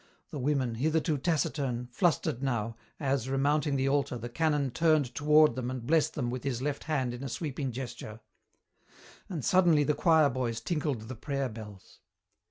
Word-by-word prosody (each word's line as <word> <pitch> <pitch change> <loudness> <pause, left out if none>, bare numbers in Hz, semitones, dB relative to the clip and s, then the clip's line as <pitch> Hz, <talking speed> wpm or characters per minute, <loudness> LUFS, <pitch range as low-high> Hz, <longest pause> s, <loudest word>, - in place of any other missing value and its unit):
The 150 - -5
women, 130 -3 0
hitherto 155 +4 0
taciturn, 140 -6 -1
flustered 145 -4 +1
now, 115 -4 -1 0.2
as, 135 -3 -1
remounting 140 +2 +1
the 135 0 +1
altar, 140 -2 +1
the 120 +1 -6
canon 145 0 0
turned 155 -3 +2
toward 150 +1 +5
them 125 -1 -3
and 130 -2 -5
blessed 155 +2 +2
them 120 -5 -2
with 125 0 -5
his 135 -4 -2
left 145 +2 -3
hand 135 -6 -1
in 125 +2 -7
a 135 - -4
sweeping 135 +1 -3
gesture. 120 -3 -7 1.1
And 165 -8 -4
suddenly 175 -6 +4
the 150 - +2
choir 160 -3 +4
boys 120 -2 -2
tinkled 150 -8 -2
the 110 +4 -7
prayer 140 +2 -2
bells. 105 -4 -11
135 Hz, 170 wpm, -30 LUFS, 125-150 Hz, 1.1 s, toward